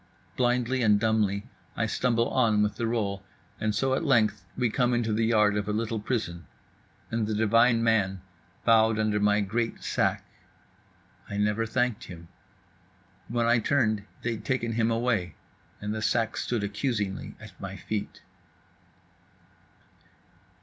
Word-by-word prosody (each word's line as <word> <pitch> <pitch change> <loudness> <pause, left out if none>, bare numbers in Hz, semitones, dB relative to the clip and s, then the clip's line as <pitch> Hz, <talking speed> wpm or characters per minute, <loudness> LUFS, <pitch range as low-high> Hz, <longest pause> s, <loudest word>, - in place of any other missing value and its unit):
Blindly 125 +1 +1
and 105 -3 +4
dumbly 105 -1 +1 0.3
I 110 - +1
stumble 115 +1 +1
on 110 -5 +3
with 105 0 -1
the 115 - -1
roll; 100 -4 -2 0.4
and 110 -1 -1
so 135 +4 +1
at 135 - 0
length 115 - +2
we 125 -3 +1
come 125 0 +2
into 115 -2 0
the 110 +1 +1
yard 105 -2 +3
of 105 0 -2
a - - 0
little 110 +1 -1
prison; 105 -7 -3 0.6
and 115 -2 0
the 110 - -1
divine 115 +2 +4
man 100 -5 +2 0.5
bowed 110 -1 +5
under 110 -1 +1
my 105 0 +3
great 115 +4 -2
sack…. - - 0 1.0
I 100 - -4
never 105 +2 +1
thanked 120 -1 -1
him. 85 -2 -11 1.0
When 120 0 0
I 120 +1 +4
turned, 110 -4 +1 0.2
they'd 115 -2 -3
taken 125 -3 -1
him 115 0 +1
away, 115 -6 0 0.4
and 105 +1 -3
the 110 - -4
sack 115 0 0
stood 120 -4 -2
accusingly 105 -2 -2
at - - -11
my - - -6
feet. 105 -2 -5
110 Hz, 145 wpm, -27 LUFS, 105-120 Hz, 1.0 s, bowed